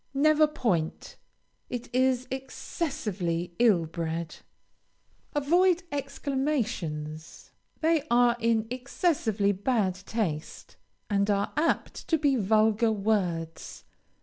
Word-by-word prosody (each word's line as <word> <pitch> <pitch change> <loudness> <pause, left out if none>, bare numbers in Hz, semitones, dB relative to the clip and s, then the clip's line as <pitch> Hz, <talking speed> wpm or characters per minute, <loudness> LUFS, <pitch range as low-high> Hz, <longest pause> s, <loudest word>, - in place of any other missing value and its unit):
Never 310 +2 +5
point. 210 - -2 0.5
It 245 -1 -5
is 255 0 +2
excessively 210 - -3
ill 210 -9 +4
bred. 165 0 -4 1.0
Avoid 350 +5 +3
exclamations; 260 - -3 0.3
they 320 -1 +3
are 240 0 +4
in 225 -1 +2
excessively 250 - 0
bad 205 -1 0
taste, 185 -4 -4 0.3
and 200 -1 +1
are 200 0 0
apt 325 +2 -1
to 325 - +3
be 285 -3 +2
vulgar 220 +1 +3
words. 185 -6 -2
225 Hz, 95 wpm, -28 LUFS, 185-275 Hz, 1.0 s, Never